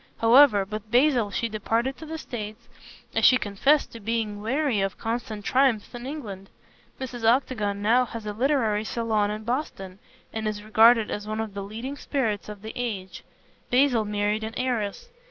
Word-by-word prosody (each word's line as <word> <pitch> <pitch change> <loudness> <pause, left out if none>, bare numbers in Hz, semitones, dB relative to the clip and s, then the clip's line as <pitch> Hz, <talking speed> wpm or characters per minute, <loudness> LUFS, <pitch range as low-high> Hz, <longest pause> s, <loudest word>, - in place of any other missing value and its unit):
However, 230 -3 +6
with 215 +1 -7
Basil 245 -2 +3
she 230 +4 -1
departed 230 +4 -1
to 315 - -10
the 320 +1 -5
States, 230 -5 -7 0.5
as - - 0
she 255 - +7
confessed 255 +7 +1
to 230 - -9
being 215 -1 -2
weary 255 -1 0
of 195 -1 -2
constant 225 -2 -4
triumphs 255 -5 +2
in 240 +1 -7
England. 205 -10 -7 0.5
Mrs. 245 -3 -6
Octagon 225 -4 +1
now 240 +4 +4
has 230 -2 -8
a 210 - -3
literary 225 -3 +1
salon 220 -2 0
in 215 +1 -4
Boston, 215 -7 -4 0.3
and 220 -1 -2
is 210 -1 -3
regarded 220 +1 +5
as 210 0 -4
one 215 0 -3
of 220 -2 -4
the 200 - -5
leading 230 +8 -6
spirits 225 -10 -2
of 210 -1 -9
the 220 - -6
age. 200 -7 -4 0.5
Basil 250 -3 +3
married 210 +1 -1
an 220 +1 -5
heiress. 245 - -2
225 Hz, 175 wpm, -25 LUFS, 210-250 Hz, 0.5 s, she